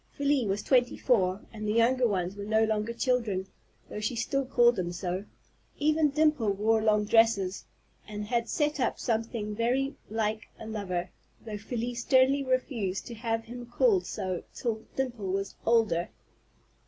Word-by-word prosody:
Felie 280 -4 +2
was 200 +1 -1
twenty 250 -2 +2
four, 195 -5 +2
and 215 -1 -5
the 210 - +1
younger 240 +2 +3
ones 185 -2 -1
were 200 - -6
no 220 +2 +2
longer 220 0 0
children, 230 -6 0 0.4
though - - -6
she 215 +3 -2
still 275 +4 0
called 240 -2 +4
them 180 -3 -2
so. 180 +2 -3 0.5
Even 305 0 +3
Dimple 300 -8 +2
wore 220 +2 +2
long 210 -1 +3
dresses, 210 -4 +3 0.4
and 210 0 -5
had 235 +1 -1
set 300 -2 0
up 250 - 0
something 225 -2 -2
very 255 +5 0 0.2
like 220 0 -2
a - - -8
lover, 185 -5 -3 0.3
though 210 -2 -5
Felie 240 +2 -3
sternly 260 +3 +3
refused 255 -7 -1
to 240 - -7
have 225 0 -2
him 240 +1 -9
called 385 - +2
so 185 -2 -3
till 225 -3 -3
Dimple 245 -7 -2
was 195 0 -2
older. 220 -7 +3
225 Hz, 160 wpm, -29 LUFS, 210-250 Hz, 0.5 s, called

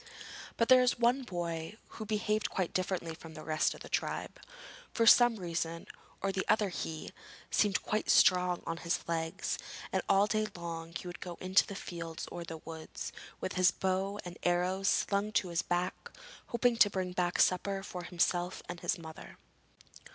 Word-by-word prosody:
But 230 - +3
there 255 -1 +8
was 250 0 +2
one 240 +3 +3
boy 170 -3 -4
who 220 - -8
behaved 215 0 0
quite 185 -3 -2
differently 180 -3 -1
from 160 -1 -11
the 155 - -8
rest 155 0 +1
of - - -14
the - - -8
tribe. - - -2 0.5
For 230 - +2
some 240 0 +8
reason 170 -3 -3 0.4
or 195 - +1 0.2
other 210 -2 +3
he 160 -3 -5 0.4
seemed 205 -3 +2
quite 215 0 -1
strong 180 -1 +5
on 165 - -3
his 170 0 -2
legs, 165 -1 -2 0.3
and - - +2
all 195 +1 +5
day 215 0 0
long 165 -1 -6
he - - -5
would 175 0 -7
go 175 -1 -6
into 185 +1 +3
the 200 - -6
fields 170 -3 -6
or 175 - -5
the 165 -1 -7
woods, 160 0 -7 0.3
with - - -3
his 185 -1 +5
bow 190 +3 -1
and 175 -1 -8
arrows 180 +2 +1
slung 200 +2 +2
to 185 - +1
his 170 -1 +1
back, 180 +1 -2 0.4
hoping 235 0 +2
to 210 - +7
bring 185 -2 -2
back 180 -1 0
a - - +5
supper 195 +1 +2
for 180 -3 -6
himself 175 +1 0
and 175 - -6
his - - 0
mother. 160 -2 -10
180 Hz, 180 wpm, -32 LUFS, 170-205 Hz, 0.5 s, there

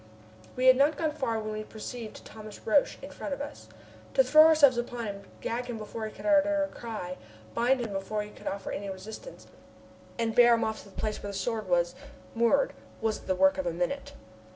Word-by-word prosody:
We 255 - 0
had 255 0 +8
not 285 +3 +3
gone 315 -2 0
far 260 -7 -1
when 215 0 -4
we 215 - -3
perceived 220 +1 -8
Thomas 215 -1 -11
Roch 275 +6 +3
in 280 - -8
front 285 - -4
of - - -13
us. 285 - -7 0.5
To 265 - +6
throw 310 +5 +8
ourselves 300 -5 +6
upon 240 -1 -4
him, 200 -1 -5 0.2
gag 245 +2 -2
him 240 -2 -4
before 220 +1 -5
he - - -8
could - - -11
utter 300 -1 +4
a 290 - -2
cry, 210 -6 -5 0.4
bind 250 +2 +2
him 220 -4 -4
before 200 +2 -2
he 210 - -10
could - - -11
offer 195 0 -3
any 200 0 -4
resistance, 220 - -9 0.7
and 230 -1 0
bear 240 0 +7
him 230 - 0
off 220 0 -2
to - - -15
the 190 - -20
place 215 -1 -3
where 205 - -5
the 200 - -5
Sword 215 0 -2
was 175 -1 +2 0.4
moored 235 +4 +3 0.3
was 220 -1 -1
the 185 - -2
work 190 +1 +4
of 185 - -1
a 170 - -1
minute. 180 +12 -3
225 Hz, 220 wpm, -29 LUFS, 205-265 Hz, 0.7 s, had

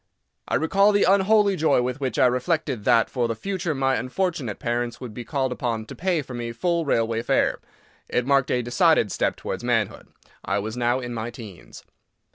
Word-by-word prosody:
I - - 0
recall 195 +6 +3
the 205 - +3
unholy 200 +1 +4
joy 150 -6 +2
with 125 +2 -3
which 130 -5 -2
I - - +5
reflected 125 - 0
that 115 -2 +4
for 120 -3 -1
the 115 - -2
future 180 - -3
my 135 0 +1
unfortunate 140 - -2
parents 120 0 -2
would 125 -4 -8
be 120 - -6
called 130 +2 -1
upon 115 -3 -2
to - - -10
pay 175 -4 0
for 130 - -10
me 120 -1 -4
full 170 +6 0
railway 115 -4 +1
fare; - - +1 0.5
it 125 - 0
marked 135 -1 +2
a 125 -1 +1
decided 120 - +3
step - - 0
towards - - -5
manhood. - - -1 0.4
I 100 - -1
was 110 +3 -4
now 120 +1 0
in 120 -1 -5
my 115 0 -4
teens. 110 -7 -11
125 Hz, 195 wpm, -24 LUFS, 120-160 Hz, 0.5 s, I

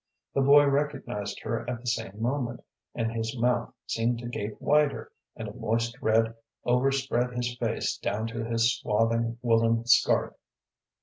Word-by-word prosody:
The 140 - +2
boy 145 +2 +7
recognized 140 -8 -2
her 115 - -2
at 120 -1 -3
the 125 - -16
same 115 -4 -2
moment, 120 0 -2 0.3
and 115 -1 -1
his 115 +1 -3
mouth 120 0 +1
seemed 115 +1 0
to 120 +1 -6
gape 105 -3 -5
wider, 145 -6 +2 0.2
and - - -6
a - - -7
moist 115 +1 -1
red 115 +1 +2 0.3
overspread 125 -1 +1
his 120 0 -2
face - - -1
down 105 +2 -2
to 115 0 -4
his 115 +1 +2
swathing 115 +2 0
woollen 115 -1 +3
scarf. 120 - +3
115 Hz, 150 wpm, -28 LUFS, 115-125 Hz, 0.3 s, boy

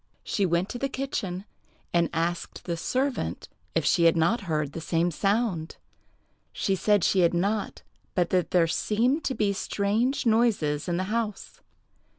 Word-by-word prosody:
She 200 -2 0
went 175 +2 +1
to 245 - -5
the 275 - -1
kitchen, 205 -9 -3 0.5
and 170 -1 +3
asked 170 +1 -2
the 170 - -2
servant 260 +10 -2 0.3
if - - +1
she 170 -2 +3
had 165 0 +5
not 170 +9 +2
heard 150 -2 0
the 165 - -6
same 170 +2 +1
sound. 195 -2 0 0.8
She 195 - 0
said 205 0 +2
she 190 - +3
had 175 -1 +3
not, 200 +4 -1 0.3
but 175 -2 +1
that 180 -2 +1
there 175 -2 +4
seemed 240 - +1
to 265 - -1
be 205 -1 +1
strange 215 +8 0
noises 220 -11 +2
in 170 - 0
the 185 - 0
house. 225 -3 -3
190 Hz, 160 wpm, -27 LUFS, 170-225 Hz, 0.8 s, had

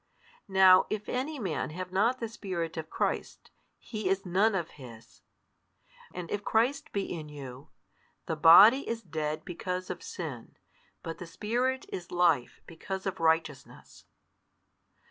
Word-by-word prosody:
Now 190 -1 +6
if 210 -1 -4
any 280 +5 -2
man 190 - -3
have 180 +3 -6
not 225 +7 +2
the 230 - -3
Spirit 185 -7 -4
of 160 -1 -6
Christ, - - -3 0.3
he 215 -4 -4
is 195 +1 0
none 195 +4 +2
of 170 -3 -3
His. 115 -2 -13 0.9
And 180 -2 -7
if 205 0 -2
Christ 255 +8 0
be 200 - -1
in 160 -5 -6
you, 135 -2 -10 0.6
the 160 - -2
body 195 - +8
|146 - - -13
is 230 0 -3
dead 155 -3 -4
because 180 0 -4
of 175 - -7
sin, 145 -10 -7 0.5
but 165 0 -6
the 175 - -7
Spirit 245 +8 -1
is 175 -2 -7
life 170 -8 +1
because 190 +3 -6
of 195 - -3
righteousness. 160 -4 -2
185 Hz, 145 wpm, -29 LUFS, 160-210 Hz, 0.9 s, body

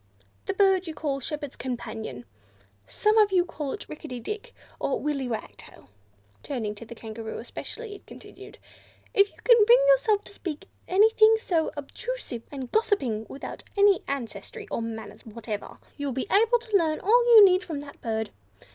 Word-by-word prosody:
"The 390 - -1
bird 385 -2 +3
you 320 - -5
call 280 -3 -2
Shepherd's 290 0 -5
Companion. 220 - -6 0.6
Some 430 +1 +2
of 420 -2 +5
you 360 -2 +3
call 300 -5 -5
it - - -7
Rickety 255 -5 -7
Dick, 425 - -6 0.2
or 275 - -1
Willy 280 -3 -2
Wagtail." 225 - -8 0.5
Turning 230 -7 -3
to 210 +2 -10
the 235 - -9
Kangaroo 220 0 -7
especially, 445 - -7
it 400 - -13
continued, - - -12 0.6
"If 400 0 +5
you - - -25
can 475 -3 +7
bring 470 +4 +7
yourself 445 -5 +4
to - - -12
speak 325 -7 -6
to - - -17 0.2
anything 435 +3 +5
so 335 -7 0
obtrusive 290 - -5
and 265 -4 -6
gossiping, 335 - 0
without 275 - -7 0.2
any 400 -2 +5
ancestry 230 -8 -5
or - - -1
manners 220 -2 -7
whatever, 220 -2 -7 0.2
you 285 -1 -3
will 270 - -2
be 265 +9 -3
able 455 +4 +5
to 455 -3 -4
learn 315 -4 0
all 475 +5 +4
you 425 -2 +11
need 370 0 +4
from 315 -6 -5
that 285 0 -12
bird. 220 -1 -2
305 Hz, 175 wpm, -26 LUFS, -, 0.6 s, you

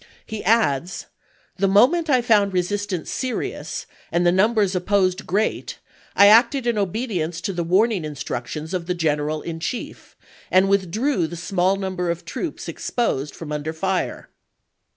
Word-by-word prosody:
" - - -31
He 220 - -4
adds: 180 -6 +1 0.5
"The 195 +1 +2
moment 265 - +4
I 255 -3 +3
found 205 -4 +3
resistance 185 -1 -2
serious, 255 -2 -4 0.3
and 175 +1 +1
the 175 - +5
numbers 205 +1 +2
op 180 0 -3
posed 190 -1 +1
great, 210 +4 -1 0.4
I 200 - +7
acted 235 +5 +5
in 240 -1 +1
obedience 190 -5 -2
to 195 - -3
the 175 -1 -2
warning 195 +2 +2
instructions 150 +2 -5
of 175 -2 -3
the 180 - -1
general 155 -2 -1
in 165 -1 -5
chief, 235 +8 -6 0.3
and 185 +1 +4
withdrew 200 +8 +1
voi.xi., - - -12
the 170 - -7
small 180 +2 +1
number 185 -2 -3
of 170 0 -3
troops 315 - -5
exposed 150 - -2
from 160 -3 -8
under 150 +1 -3
p.^aee."' 160 - -18
fire." 190 0 -2
190 Hz, 165 wpm, -22 LUFS, 170-215 Hz, 0.5 s, I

